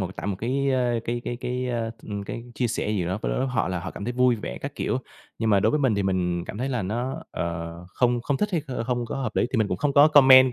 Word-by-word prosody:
một 95 Hz, 0 st, -4 dB
tải -, -, -5 dB
một 100 Hz, -2 st, -1 dB
cái, 135 Hz, +5 st, 0 dB
ơ, 125 Hz, -3 st, +1 dB
cái 120 Hz, +1 st, -2 dB
cái 120 Hz, -, -3 dB
cái, 125 Hz, 0 st, -3 dB
ơ, 115 Hz, -2 st, -1 dB
ừm, 100 Hz, -2 st, -5 dB
cái 115 Hz, -, -5 dB
chia 125 Hz, -, +1 dB
sẻ 110 Hz, -2 st, -1 dB
gì 100 Hz, -5 st, 0 dB
đó 95 Hz, +4 st, -2 dB
với 130 Hz, -, 0 dB
họ 120 Hz, -7 st, 0 dB
là 90 Hz, -2 st, -2 dB
họ 95 Hz, -, -5 dB
cảm 100 Hz, -, -7 dB
thấy 120 Hz, -, -2 dB
vui 125 Hz, -1 st, +3 dB
vẻ -, -, -6 dB
các -, -, -6 dB
kiểu. -, -, -1 dB, 0.4 s
Nhưng 110 Hz, -1 st, +1 dB
mà 100 Hz, -2 st, +5 dB
đối 110 Hz, -, +3 dB
với 150 Hz, -, +1 dB
mình 130 Hz, -6 st, +3 dB
thì 100 Hz, -, 0 dB
mình 90 Hz, -2 st, 0 dB
cảm 105 Hz, -, -7 dB
thấy 130 Hz, +2 st, -1 dB
là 125 Hz, -6 st, -1 dB
nó, 120 Hz, +7 st, -3 dB
ờ, 85 Hz, 0 st, -3 dB
không 120 Hz, +5 st, +1 dB
không 140 Hz, 0 st, 0 dB
thích 210 Hz, -, 0 dB
hay 165 Hz, -5 st, +1 dB, 0.2 s
không 120 Hz, -1 st, 0 dB
có -, -, -4 dB
hợp 135 Hz, -2 st, -3 dB
lý -, -, +3 dB
thì 125 Hz, -, +2 dB
mình 105 Hz, -2 st, +2 dB
cũng 90 Hz, -, -1 dB
không 140 Hz, +7 st, 0 dB
có 145 Hz, +2 st, +7 dB
comment, 130 Hz, -3 st, +8 dB
120 Hz, 290 wpm, -25 LUFS, 100-130 Hz, 0.4 s, comment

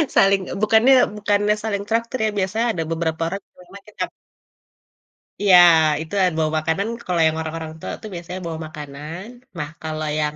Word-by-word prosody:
Saling 195 Hz, 0 st, +5 dB
eee, -, -, -5 dB
bukannya 220 Hz, +5 st, +5 dB, 0.2 s
bukannya 205 Hz, 0 st, +1 dB
saling 200 Hz, -2 st, -2 dB
traktir 230 Hz, +3 st, 0 dB
ya. -, -, +2 dB
Biasanya 210 Hz, +5 st, 0 dB
ada 165 Hz, -4 st, -2 dB
beberapa 165 Hz, -1 st, -2 dB
orang 195 Hz, +4 st, -4 dB
yang -, -, -44 dB
memang 195 Hz, +2 st, -13 dB
kita -, -, -4 dB, 1.4 s
Iya 195 Hz, -3 st, +7 dB, 0.4 s
itu 160 Hz, +5 st, -9 dB
ada 180 Hz, -2 st, +2 dB
bawa 155 Hz, -1 st, +1 dB
makanan. 160 Hz, +6 st, -1 dB, 0.2 s
Kalau 175 Hz, -2 st, 0 dB
yang 160 Hz, 0 st, -1 dB
orang-orang 160 Hz, 0 st, -5 dB
tua -, -, -6 dB
tuh 215 Hz, -, -8 dB
biasanya 175 Hz, +2 st, -6 dB
bawa 160 Hz, -1 st, -5 dB
makanan. 150 Hz, +3 st, -8 dB, 0.3 s
Nah, 150 Hz, -2 st, -4 dB
kalau 155 Hz, 0 st, -4 dB
yang 150 Hz, 0 st, -1 dB
180 Hz, 175 wpm, -21 LUFS, 160-205 Hz, 1.4 s, Iya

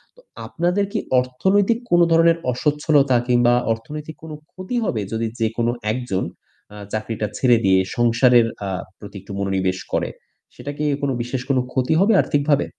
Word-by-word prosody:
তো -, -, -21 dB, 0.3 s
আপনাদের 180 Hz, +4 st, 0 dB
কি 215 Hz, -, 0 dB, 0.2 s
অর্থনৈতিক 190 Hz, -, +1 dB
কোনো 175 Hz, 0 st, +5 dB
ধরনের 165 Hz, 0 st, +5 dB
অস্বচ্ছলতা 145 Hz, 0 st, +2 dB
কিংবা 120 Hz, -1 st, +4 dB, 0.2 s
অর্থনৈতিক 150 Hz, +7 st, -8 dB
কোনো 155 Hz, -1 st, -7 dB, 0.2 s
ক্ষতি 185 Hz, +7 st, -6 dB
হবে 110 Hz, -, -1 dB
যদি 115 Hz, 0 st, -1 dB
যেকোনো 115 Hz, +1 st, 0 dB, 0.2 s
১ 110 Hz, -, -2 dB
জন 95 Hz, 0 st, 0 dB, 0.5 s
আ -, -, -10 dB, 0.2 s
চাকরিটা 110 Hz, 0 st, -3 dB
ছেড়ে 120 Hz, -3 st, +4 dB
দিয়ে 95 Hz, 0 st, +4 dB, 0.2 s
সংসারের 120 Hz, 0 st, +4 dB, 0.2 s
আ -, -, -3 dB, 0.3 s
প্রতি 105 Hz, -1 st, -11 dB
একটু 100 Hz, -, -12 dB
মনোনিবেশ 95 Hz, -2 st, -1 dB, 0.2 s
করে? -, -, 0 dB, 0.5 s
সেটা 145 Hz, -, -6 dB
কি 150 Hz, -, -3 dB, 0.2 s
কোনো 135 Hz, -, 0 dB
বিশেষ 125 Hz, +1 st, -4 dB
কোন 135 Hz, -, +2 dB
ক্ষতি 130 Hz, +4 st, 0 dB
হবে 220 Hz, +3 st, +4 dB
আর্থিকভাবে? 145 Hz, 0 st, +1 dB
130 Hz, 160 wpm, -21 LUFS, 115-160 Hz, 0.5 s, কোনো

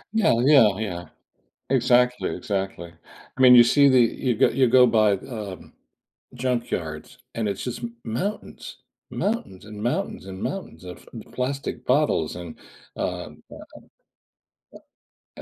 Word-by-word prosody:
Yeah, 220 Hz, -, +3 dB
yeah, 115 Hz, -10 st, +5 dB
yeah. 90 Hz, -5 st, -5 dB, 0.6 s
Exactly, 125 Hz, -1 st, +2 dB
exactly. 95 Hz, -6 st, -4 dB, 0.4 s
I -, -, -9 dB
mean, 125 Hz, -1 st, +8 dB
you 120 Hz, -1 st, +9 dB
see 140 Hz, +3 st, +4 dB
the 130 Hz, -1 st, +4 dB
you 120 Hz, 0 st, -1 dB
go -, -, +4 dB
you 130 Hz, -3 st, +2 dB
go 125 Hz, +1 st, +6 dB
by, 110 Hz, -3 st, +3 dB
um, 100 Hz, -2 st, -7 dB, 0.6 s
junkyards, 120 Hz, -11 st, -4 dB, 0.2 s
and 115 Hz, -2 st, -2 dB
it's 100 Hz, -, -4 dB
just 125 Hz, -1 st, -5 dB
m 115 Hz, 0 st, -7 dB
mountains. 125 Hz, -, -5 dB, 0.3 s
Mountains 200 Hz, -, -3 dB
and 105 Hz, -1 st, -9 dB
mountains 120 Hz, -4 st, -2 dB
and 95 Hz, 0 st, -8 dB
mountains 190 Hz, -, -6 dB
of 90 Hz, 0 st, -11 dB
p 115 Hz, -3 st, -8 dB
plastic 135 Hz, +2 st, -4 dB
bottles 130 Hz, -, +1 dB
and, 85 Hz, -2 st, -9 dB, 0.4 s
um, -, -, -5 dB
uh -, -, -10 dB
uh, -, -, -11 dB, 1.6 s
uh, -, -, -16 dB
120 Hz, 140 wpm, -24 LUFS, 100-130 Hz, 1.6 s, you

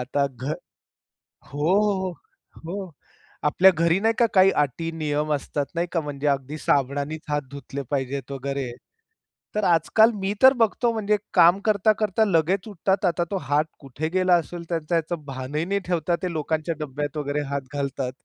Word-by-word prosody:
आता 140 Hz, +3 st, 0 dB
घर. 135 Hz, +2 st, -4 dB, 0.9 s
हो, 145 Hz, +3 st, -2 dB
हो, 190 Hz, -3 st, 0 dB
हो, 175 Hz, +3 st, -10 dB
हो. 180 Hz, -, -14 dB, 0.6 s
आपल्या 185 Hz, +6 st, +6 dB
घरी 170 Hz, +3 st, +2 dB
नाही 225 Hz, +2 st, +2 dB
का 235 Hz, -, +6 dB
काही 190 Hz, 0 st, +6 dB
अटी 165 Hz, +4 st, -2 dB
नियम 155 Hz, -1 st, -2 dB
असतात 145 Hz, 0 st, -2 dB
नाही 170 Hz, +1 st, 0 dB
का 170 Hz, -, +1 dB
म्हणजे 145 Hz, -1 st, -4 dB
अगदी 140 Hz, +1 st, -1 dB
साबणानीच 145 Hz, +2 st, 0 dB
हात 145 Hz, 0 st, +1 dB
धुतले 140 Hz, 0 st, -6 dB
पाहिजेत 135 Hz, -1 st, -2 dB
वगैरे. 135 Hz, -1 st, -3 dB, 0.8 s
तर 210 Hz, -, 0 dB
आजकाल 180 Hz, +7 st, +4 dB
मी 195 Hz, +1 st, 0 dB
तर 260 Hz, +1 st, +9 dB
बघतो 235 Hz, 0 st, +1 dB
म्हणजे 210 Hz, -1 st, +1 dB, 0.2 s
काम 175 Hz, +3 st, +6 dB
करता-करता 215 Hz, 0 st, +2 dB
लगेच 185 Hz, +1 st, +1 dB
उठतात 195 Hz, 0 st, 0 dB
आता 175 Hz, -1 st, +1 dB
तो 200 Hz, -, 0 dB
हात 145 Hz, +2 st, +2 dB
कुठे 140 Hz, +3 st, -5 dB
गेला 185 Hz, -1 st, +3 dB
असेल 175 Hz, +1 st, -8 dB
त्यांचा 165 Hz, 0 st, -1 dB
ह्याचं 165 Hz, -1 st, -2 dB
भानही 135 Hz, +3 st, -3 dB
नाही 200 Hz, +2 st, 0 dB
ठेवता 175 Hz, -1 st, +1 dB
ते 180 Hz, -, -1 dB
लोकांच्या 160 Hz, +1 st, -2 dB
डब्यात 145 Hz, 0 st, -4 dB
वगैरे 145 Hz, 0 st, -1 dB
हात 140 Hz, -, -1 dB
घालतात. 140 Hz, -2 st, -2 dB
160 Hz, 165 wpm, -24 LUFS, 145-190 Hz, 0.9 s, तर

